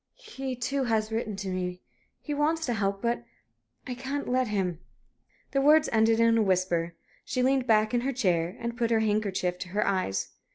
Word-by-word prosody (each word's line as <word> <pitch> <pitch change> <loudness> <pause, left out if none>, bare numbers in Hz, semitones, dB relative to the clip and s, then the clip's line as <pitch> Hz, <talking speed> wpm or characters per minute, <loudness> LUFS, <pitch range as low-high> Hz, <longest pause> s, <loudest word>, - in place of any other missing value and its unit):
"He, 270 - -6
too, 265 +2 -1
has 220 -2 0
written 220 -2 -2
to 195 0 -5
me. 180 -1 -3 0.4
He 295 - -5
wants 315 +3 +1
to 245 - 0
help 200 -1 -1
me. - - +1
But 235 - -4 0.6
I 250 - -4
can't 270 +3 -4
let 255 0 +1
him." 190 -5 -1 0.7
The 275 - +2
words 305 +2 +5
ended 225 0 +3
in 230 0 +4
a - - +4
whisper. 180 -4 +1 0.3
She 255 - -1
leaned 260 -1 +2
back 215 0 +3
in 240 - +2
her 270 +3 -1
chair, 180 -7 0
and 235 0 -4
put 235 -1 0
her 225 -1 +3
handkerchief 200 -4 0
to - - -5
her 205 +3 0
eyes. 185 - -1
225 Hz, 200 wpm, -28 LUFS, 190-255 Hz, 0.7 s, words